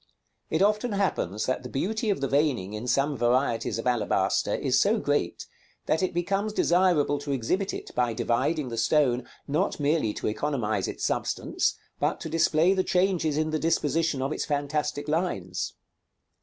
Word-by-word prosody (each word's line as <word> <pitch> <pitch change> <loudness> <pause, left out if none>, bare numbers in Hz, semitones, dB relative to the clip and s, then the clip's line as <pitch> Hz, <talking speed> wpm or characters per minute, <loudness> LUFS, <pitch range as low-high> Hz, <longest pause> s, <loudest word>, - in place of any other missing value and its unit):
It 160 +4 +2
often 210 +2 +1
happens 110 - -1
that 130 - -1
the 125 - -8
beauty 220 - -1
of 195 -8 0
the 135 - +1
veining 135 -10 +1
in 105 +3 -5
some 135 +4 +1
varieties 120 -1 +1
of 115 - -5
alabaster 120 -4 +1
is - - +1
so - - +3
great, - - -1 0.4
that 160 - +1
it 185 - +1
becomes 195 +5 -1
desirable 170 -7 +3
to 145 0 -5
exhibit 160 - 0
it - - -7
by 120 -2 +1
dividing 125 +5 0
the 115 -1 -3
stone, 125 -1 +2 0.2
not 155 +7 0
merely 145 -6 +1
to - - -5
economize 110 -5 -1
its - - -4
substance, - - 0 0.2
but - - 0
to - - -5
display 165 +2 +3
the 190 -1 +1
changes 180 -6 +1
in 155 0 0
the 155 - 0
disposition 160 -3 +1
of 135 - -2
its - - -2
fantastic 145 0 -2
lines. 150 - -2
150 Hz, 170 wpm, -27 LUFS, 125-170 Hz, 0.4 s, so